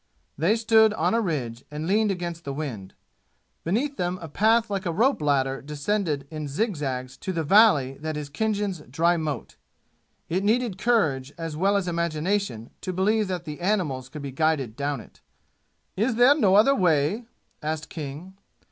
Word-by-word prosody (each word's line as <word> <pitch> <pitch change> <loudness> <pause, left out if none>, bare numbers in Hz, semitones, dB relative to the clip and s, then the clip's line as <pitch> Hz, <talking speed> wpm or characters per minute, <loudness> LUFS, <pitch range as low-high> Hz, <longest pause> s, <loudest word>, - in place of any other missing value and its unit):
They 170 +9 +2
stood 220 -1 +4
on - - +1
a 230 - +2
ridge 130 - -3
and 150 +1 -5
leaned 210 +4 +2
against 175 -3 -4
the 140 -1 -5
wind. 115 -11 -6 0.7
Beneath 260 - -1
them 180 +1 -1
a 165 - -7
path 220 +8 +3
like 195 -2 -3
a - - 0
rope 230 - +2
ladder 135 -2 +1
descended 150 0 -2
in 155 -1 -5
zigzags 140 - -2
to 190 - -4
the 165 -3 -1
valley 150 - +4
that 155 0 -4
is 150 -1 -5
Khinjan's 205 +3 -1
dry 170 +6 +2
moat; 155 -6 -4 0.7
it 180 +3 -1
needed 220 -2 +1
courage 155 - +1
as 165 -2 -5
well 195 +5 +2
as 190 -2 -2
imagination 170 - -1
to 185 - -3
believe 205 +4 +1
that 180 -2 -4
the 150 -2 -7
animals 165 -10 -1
could 150 +1 -8
be 140 - -5
guided 140 -5 0
down 140 -2 -2
it. - - -18 0.7
"Is 225 +5 +1
there 245 +4 +7
no 205 -11 +3
other 220 +7 +6
way?" 180 - +1 0.4
asked 155 0 -3
King. 155 +4 -7
170 Hz, 170 wpm, -25 LUFS, 145-205 Hz, 0.7 s, there